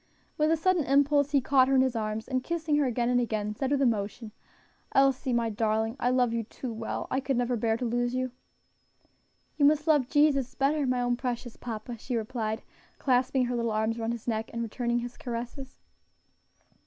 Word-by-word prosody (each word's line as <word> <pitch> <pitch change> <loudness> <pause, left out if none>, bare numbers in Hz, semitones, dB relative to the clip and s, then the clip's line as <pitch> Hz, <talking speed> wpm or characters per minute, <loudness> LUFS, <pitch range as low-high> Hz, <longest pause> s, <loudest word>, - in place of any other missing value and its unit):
With 305 0 +2
a 325 - +3
sudden 360 0 +2
impulse 285 +1 +3
he 285 -2 +3
caught 260 0 +4
her 270 - +2
in 260 - +6
his 260 -2 +1
arms, 215 0 -3
and 255 -1 -1
kissing 330 -3 -1
her 295 - +3
again 240 -1 0
and 245 0 +3
again, 215 -3 -2
said 260 +5 -2
with 280 -1 +2
emotion, 220 -1 -1 0.6
"Elsie, 270 -1 +3
my 235 -2 +1
darling, 220 +1 0
I 245 - +1
love 250 -2 +2
you 230 - 0
too 235 +2 -7
well; 220 0 -4
I 260 - +1
could 270 -1 -1
never 245 0 +1
bear 225 0 0
to 245 - -3
lose 245 +1 0
you." 255 0 -1 1.3
"You 290 - +4
must 300 +1 +4
love 295 -6 +3
Jesus 275 -4 +2
better, 280 +1 +1
my 250 -1 +1
own 245 0 0
precious 240 -2 -4
papa," 230 0 -6
she 250 +2 -4
replied, 220 -1 -3 0.3
clasping 260 0 +2
her 245 0 -2
little 235 -1 0
arms 220 +1 0
around 225 +1 -1
his 235 0 -8
neck, 220 -1 -1
and 235 0 -3
returning 240 +1 -1
his 240 +1 -7
caresses. 245 +2 -6
245 Hz, 200 wpm, -28 LUFS, 230-270 Hz, 1.3 s, in